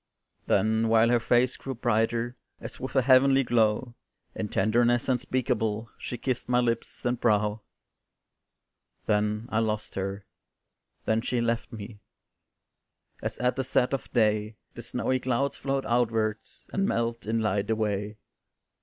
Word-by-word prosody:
Then 110 Hz, +1 st, +2 dB
while 115 Hz, +1 st, +4 dB
her 120 Hz, 0 st, +4 dB
face 120 Hz, +2 st, +2 dB
grew 135 Hz, -1 st, -6 dB
brighter 115 Hz, +1 st, 0 dB, 0.2 s
As -, -, -9 dB
with 130 Hz, +2 st, -6 dB
a 130 Hz, -, +4 dB
heavenly 135 Hz, +1 st, +5 dB
glow, 115 Hz, 0 st, +1 dB, 0.4 s
In 105 Hz, -, -4 dB
tenderness 120 Hz, +3 st, +2 dB
unspeakable, 120 Hz, -4 st, -1 dB
She 125 Hz, -, -5 dB
kissed 125 Hz, 0 st, -3 dB
my 125 Hz, 0 st, +3 dB
lips 115 Hz, -1 st, -2 dB
and 120 Hz, 0 st, 0 dB
brow; 105 Hz, -1 st, +2 dB, 1.4 s
Then 105 Hz, +2 st, 0 dB
I 110 Hz, -, +2 dB
lost 110 Hz, -1 st, -2 dB
her 95 Hz, +1 st, -4 dB, 0.8 s
then 110 Hz, +1 st, +2 dB
she 120 Hz, +1 st, -1 dB
left 115 Hz, +1 st, -1 dB
me, 105 Hz, -1 st, -9 dB, 1.2 s
As -, -, -4 dB
at 125 Hz, 0 st, +1 dB
the 135 Hz, -, -1 dB
set 130 Hz, 0 st, +1 dB
of 135 Hz, -, -3 dB
day 110 Hz, -2 st, +1 dB, 0.2 s
The -, -, -8 dB
snowy 130 Hz, 0 st, -1 dB
clouds 130 Hz, +2 st, 0 dB
float 135 Hz, 0 st, -2 dB
outward, 115 Hz, -2 st, +1 dB, 0.3 s
And 195 Hz, 0 st, +1 dB
melt 115 Hz, -2 st, -1 dB
in 115 Hz, +1 st, +1 dB
light 105 Hz, -2 st, 0 dB
away. 105 Hz, -1 st, -1 dB
115 Hz, 140 wpm, -27 LUFS, 110-125 Hz, 1.4 s, heavenly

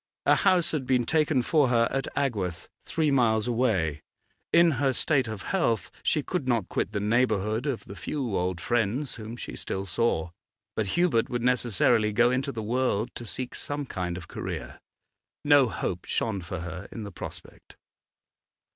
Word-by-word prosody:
A -, -, +6 dB
house 180 Hz, -3 st, +3 dB
had 140 Hz, -5 st, -2 dB
been 125 Hz, -2 st, +2 dB
taken 155 Hz, -4 st, +2 dB
for 150 Hz, -1 st, +3 dB
her 115 Hz, -1 st, +3 dB
at 135 Hz, -1 st, -1 dB
Agworth, 105 Hz, -12 st, -1 dB, 0.2 s
three 155 Hz, -3 st, +1 dB
miles 115 Hz, -4 st, +3 dB
away; 105 Hz, -, +1 dB, 0.5 s
in 170 Hz, 0 st, +6 dB
her 135 Hz, -2 st, +3 dB
state 135 Hz, -3 st, +2 dB
of 110 Hz, -2 st, -6 dB
health 165 Hz, -, 0 dB
she 150 Hz, -, +1 dB
could 175 Hz, -5 st, -3 dB
not 115 Hz, -6 st, +1 dB
quit 100 Hz, -, -1 dB
the 105 Hz, -, -1 dB
neighbourhood 110 Hz, +2 st, +1 dB
of 135 Hz, -5 st, -2 dB
the 100 Hz, -, -9 dB
few 125 Hz, -3 st, -3 dB
old 90 Hz, -1 st, -1 dB
friends 120 Hz, +5 st, 0 dB
whom 115 Hz, +1 st, -7 dB
she -, -, -6 dB
still 95 Hz, 0 st, -4 dB
saw. 90 Hz, -5 st, 0 dB, 0.4 s
But 110 Hz, -2 st, 0 dB
Hubert 170 Hz, -11 st, +3 dB
would 120 Hz, -1 st, -2 dB
necessarily 120 Hz, -3 st, +2 dB
go 120 Hz, +3 st, +4 dB
into 130 Hz, +2 st, 0 dB
the 110 Hz, -4 st, -5 dB
world 120 Hz, -1 st, 0 dB
to 120 Hz, -, -8 dB
seek 125 Hz, +3 st, -5 dB
some 145 Hz, 0 st, -4 dB
kind 90 Hz, -7 st, -3 dB
of 85 Hz, -3 st, -9 dB
career. -, -, -6 dB, 0.7 s
No 145 Hz, -4 st, +6 dB
hope 90 Hz, -4 st, -3 dB
shone 105 Hz, -4 st, -1 dB
for 85 Hz, 0 st, -5 dB
her 85 Hz, +2 st, -6 dB
in 115 Hz, -, -6 dB
the 100 Hz, -, -7 dB
prospect. -, -, -10 dB
120 Hz, 175 wpm, -27 LUFS, 105-135 Hz, 0.7 s, A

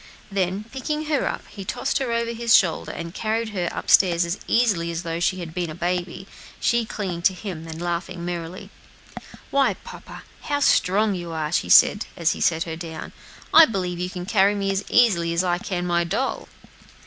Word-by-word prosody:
Then, 195 Hz, +1 st, -1 dB
picking 300 Hz, +4 st, -3 dB
her 300 Hz, -2 st, 0 dB
up, -, -, -4 dB
he 200 Hz, -, -9 dB
tossed 270 Hz, +8 st, -1 dB
her 260 Hz, -3 st, -2 dB
over 235 Hz, 0 st, 0 dB
his 235 Hz, -1 st, +3 dB
shoulder, 170 Hz, -5 st, 0 dB
and 170 Hz, 0 st, -7 dB
carried 225 Hz, +2 st, -1 dB
her 180 Hz, -5 st, -2 dB
up -, -, -6 dB
stairs 175 Hz, -2 st, +5 dB
as 170 Hz, +4 st, -3 dB
easily 205 Hz, -8 st, +2 dB
as 170 Hz, +1 st, -4 dB
though 165 Hz, 0 st, -3 dB
she 185 Hz, +1 st, 0 dB
had 165 Hz, -2 st, -7 dB
been 175 Hz, -1 st, -2 dB
a 155 Hz, -, -7 dB
baby, 180 Hz, +1 st, -3 dB, 0.3 s
she 235 Hz, -1 st, +1 dB
clinging 190 Hz, -6 st, -4 dB
to 185 Hz, +2 st, +3 dB
him 180 Hz, -5 st, -7 dB
and 160 Hz, 0 st, -7 dB
laughing 175 Hz, 0 st, -3 dB
merrily. 175 Hz, 0 st, -6 dB, 0.8 s
"Why, 275 Hz, -1 st, +2 dB
papa, -, -, -11 dB, 0.2 s
how 285 Hz, -1 st, -1 dB
strong 205 Hz, -4 st, +3 dB
you 175 Hz, -2 st, -5 dB
are," 155 Hz, -1 st, -3 dB
she -, -, 0 dB
said, 205 Hz, -, +6 dB
as 165 Hz, -2 st, +2 dB
he -, -, -5 dB
set 165 Hz, -1 st, +2 dB
her 160 Hz, -1 st, -5 dB
down. 160 Hz, -1 st, -8 dB, 0.4 s
"I 325 Hz, -, +10 dB
believe 180 Hz, -4 st, -3 dB
you 180 Hz, 0 st, -2 dB
can 180 Hz, -1 st, -6 dB
carry 200 Hz, +1 st, +3 dB
me 195 Hz, -1 st, -1 dB
as 195 Hz, 0 st, -1 dB
easily 170 Hz, -9 st, +3 dB
as 170 Hz, -, +2 dB
I 175 Hz, -1 st, 0 dB
can 180 Hz, -2 st, -3 dB
my 170 Hz, -1 st, +1 dB
doll." 205 Hz, +10 st, -2 dB
180 Hz, 200 wpm, -23 LUFS, 170-215 Hz, 0.8 s, I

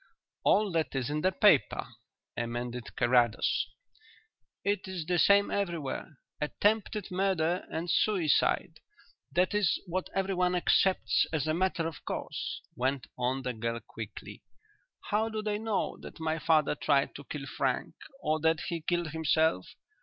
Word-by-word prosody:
"All 210 Hz, -2 st, +3 dB
that 160 Hz, -4 st, -1 dB
is 135 Hz, +1 st, -1 dB
in 150 Hz, +1 st, -1 dB
the 185 Hz, -, +3 dB
paper," -, -, +3 dB, 0.5 s
amended 120 Hz, +1 st, -4 dB
Carrados. 120 Hz, -2 st, +2 dB, 1.0 s
"It 200 Hz, -1 st, 0 dB
is 185 Hz, -4 st, -4 dB
the 175 Hz, +1 st, +1 dB
same 200 Hz, +2 st, +5 dB
everywhere 170 Hz, -6 st, -3 dB, 0.2 s
'attempted 205 Hz, +5 st, 0 dB
murder 180 Hz, -2 st, 0 dB
and 165 Hz, +2 st, -3 dB
suicide' 175 Hz, -4 st, +2 dB, 0.5 s
that 180 Hz, +3 st, +2 dB
is 205 Hz, -4 st, +2 dB
what 185 Hz, +1 st, -3 dB
everyone 185 Hz, -2 st, +1 dB
accepts 185 Hz, +1 st, +3 dB
as 155 Hz, -3 st, 0 dB
a 155 Hz, -, +1 dB
matter 180 Hz, -1 st, 0 dB
of 160 Hz, -5 st, -8 dB
course," -, -, -4 dB
went 130 Hz, +1 st, -1 dB
on 130 Hz, +2 st, -1 dB
the 125 Hz, -1 st, -2 dB
girl 115 Hz, +1 st, -3 dB
quickly. 115 Hz, -, -9 dB, 0.7 s
"How 220 Hz, +2 st, +2 dB
do 215 Hz, -1 st, -4 dB
they 210 Hz, -1 st, -1 dB
know 220 Hz, -3 st, -1 dB
that -, -, -10 dB
my 160 Hz, 0 st, -1 dB
father 155 Hz, -2 st, +3 dB
tried 140 Hz, -1 st, +1 dB
to 145 Hz, -, -9 dB
kill 145 Hz, -2 st, -6 dB
Frank, -, -, -1 dB, 0.3 s
or 155 Hz, +1 st, +1 dB
that 160 Hz, 0 st, +2 dB
he 170 Hz, -2 st, -3 dB
killed 175 Hz, 0 st, -1 dB
himself? 160 Hz, -, +2 dB
165 Hz, 145 wpm, -30 LUFS, 140-190 Hz, 1.0 s, same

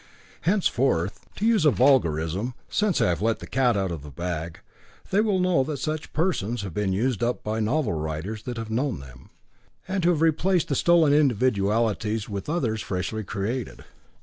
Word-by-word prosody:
Henceforth, 130 Hz, -, 0 dB
to 210 Hz, -, -2 dB
use 225 Hz, -6 st, +3 dB
a 150 Hz, -, +6 dB
vulgarism, 115 Hz, -, +2 dB
since 210 Hz, -4 st, +1 dB
I -, -, +3 dB
have 85 Hz, +1 st, -1 dB
let 115 Hz, +1 st, +1 dB
the -, -, -9 dB
cat 125 Hz, -4 st, +2 dB
out 95 Hz, -2 st, -1 dB
of 80 Hz, -4 st, -5 dB
the 75 Hz, -, -10 dB
bag, 85 Hz, +2 st, -5 dB, 0.5 s
they 200 Hz, -, +4 dB
will 210 Hz, -3 st, +1 dB
know 180 Hz, -7 st, +2 dB
that 150 Hz, 0 st, -3 dB
such 155 Hz, +2 st, -4 dB
persons 120 Hz, -, -1 dB
have 95 Hz, -4 st, -6 dB
been 105 Hz, 0 st, 0 dB
used 115 Hz, +4 st, 0 dB
up 120 Hz, +1 st, -1 dB
by 110 Hz, +1 st, -2 dB
novel 115 Hz, -, 0 dB
writers 80 Hz, +7 st, -4 dB
that 125 Hz, -2 st, -4 dB
have 115 Hz, -1 st, -5 dB
known 125 Hz, -, -1 dB
them, 65 Hz, -2 st, -13 dB, 0.6 s
and 190 Hz, -1 st, -1 dB
who 175 Hz, -, +4 dB
have 165 Hz, -2 st, +2 dB
replaced 165 Hz, +3 st, +2 dB
the 140 Hz, -, +1 dB
stolen 165 Hz, -1 st, +4 dB
individualities 110 Hz, -5 st, +1 dB
with 100 Hz, +4 st, -5 dB
others 120 Hz, -10 st, -1 dB
freshly 95 Hz, +4 st, -3 dB
created. 110 Hz, +5 st, -4 dB
115 Hz, 180 wpm, -25 LUFS, 100-150 Hz, 0.6 s, a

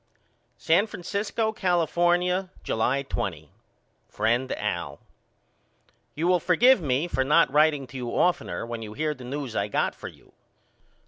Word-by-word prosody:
San 180 Hz, +7 st, +2 dB
Francisco, 210 Hz, +3 st, -2 dB
California, 180 Hz, 0 st, +1 dB
July 130 Hz, +5 st, 0 dB
20. 85 Hz, -, -4 dB, 0.6 s
FRIEND 120 Hz, +3 st, 0 dB
AL: -, -, -4 dB, 1.2 s
You 160 Hz, -, -2 dB
will 180 Hz, 0 st, +3 dB
forgive 210 Hz, +8 st, +4 dB
me 140 Hz, +2 st, 0 dB
for 135 Hz, -6 st, 0 dB
not 135 Hz, 0 st, +3 dB
writeing 150 Hz, -2 st, +3 dB
to 130 Hz, -, -10 dB
you 125 Hz, -1 st, -4 dB
oftener 120 Hz, -, 0 dB
when 115 Hz, -1 st, -6 dB
you 105 Hz, -1 st, -7 dB
hear 155 Hz, +4 st, -1 dB
the 130 Hz, -, -13 dB
news 130 Hz, -1 st, -5 dB
I 100 Hz, -, 0 dB
got -, -, 0 dB
for -, -, -9 dB
you. -, -, -16 dB
150 Hz, 140 wpm, -26 LUFS, 125-180 Hz, 1.2 s, forgive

